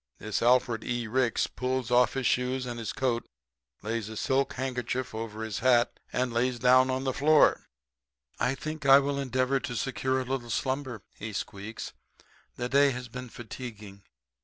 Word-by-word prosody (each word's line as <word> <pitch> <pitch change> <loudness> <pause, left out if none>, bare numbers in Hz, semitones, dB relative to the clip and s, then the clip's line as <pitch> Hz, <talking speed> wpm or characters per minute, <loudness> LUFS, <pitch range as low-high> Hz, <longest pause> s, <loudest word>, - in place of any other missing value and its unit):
"This 110 -1 -3
Alfred 120 -2 +3
E. 120 -1 -2
Ricks 120 +1 +1
pulls 125 -1 -3
off 125 0 +4
his 135 -1 -1
shoes 125 +1 +1
and 120 -1 -5
his 110 -3 -3
coat, 120 -3 0 0.6
lays 110 0 -2
a 110 - -7
silk 135 +4 +1
handkerchief 130 -1 -3
over 110 0 -5
his 110 -2 -3
hat, 125 -2 +3
and 125 -1 -1
lays 125 +1 +1
down 130 +1 +5
on 130 0 -1
the 130 -1 0
floor. 150 +3 +4 0.7
"'I 130 - +1
think 155 +2 -6
I 135 0 +10
will 140 0 0
endeavor 130 0 +1
to 125 - -5
secure 130 +1 -1
a 130 - -3
little 125 -2 -3
slumber,' 130 -2 -2 0.2
he 110 0 -5
squeaks. 100 +3 -6 0.6
'The 120 0 -3
day 140 +1 +5
has 125 -1 -5
been 125 +1 -7
fatiguing. 110 -4 -9
125 Hz, 170 wpm, -28 LUFS, 115-130 Hz, 0.7 s, I